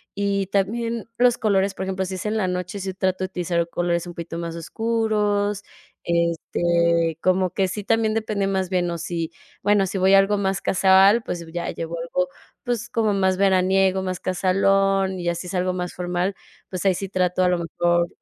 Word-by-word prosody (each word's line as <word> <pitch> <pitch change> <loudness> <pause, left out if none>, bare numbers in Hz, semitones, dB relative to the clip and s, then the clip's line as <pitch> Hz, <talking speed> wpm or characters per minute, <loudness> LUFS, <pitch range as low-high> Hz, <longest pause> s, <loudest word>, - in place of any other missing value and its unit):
Y 200 -1 0
también 230 +4 -1
los 245 -1 +4
colores, 195 -2 +2
por 190 - -4
ejemplo, 190 0 -2
si 190 +1 -5
es 185 - -6
en 220 +1 -1
la 190 -3 0
noche, 180 +2 -3
si 190 0 -4
trato 185 0 -1
de - - +1
utilizar 175 -2 -1
colores 170 0 -1
un 175 - -7
poquito 170 0 -6
más 170 -1 -4
oscuros, 210 +1 0 0.4
este, 170 -1 +1
como 185 0 +2
que 195 +1 0
sí 200 +3 -5
también 225 0 +1
depende 215 -2 -1
más 190 -2 -1
bien 180 -2 0
o 170 - -4
si, 165 -1 -3 0.3
bueno, 205 -1 +3
si 195 - -3
voy 190 +1 +4
a 195 - +8
algo 200 +1 +2
más 195 -1 -1
casual, 195 +4 +5
pues 170 -1 -4
ya 170 0 -3
llevo 165 +1 -5
algo, 180 +2 -1 0.3
pues, 235 -1 -2
como 220 -3 +1
más 190 -1 +1
veraniego, 190 0 +3
más 185 -1 -3
casualón, 195 +1 +1
y 175 - -5
ya 170 - +1
sí 180 - -6
es 190 - -5
algo 180 0 0
más 180 -1 -4
formal, 180 +2 -2 0.3
pues 185 +1 -5
ahí 190 - +5
sí 195 +1 -5
trato 185 -1 +1
a 180 - +3
lo 180 - +2
mejor 175 +1 +1
190 Hz, 200 wpm, -23 LUFS, 175-200 Hz, 0.4 s, a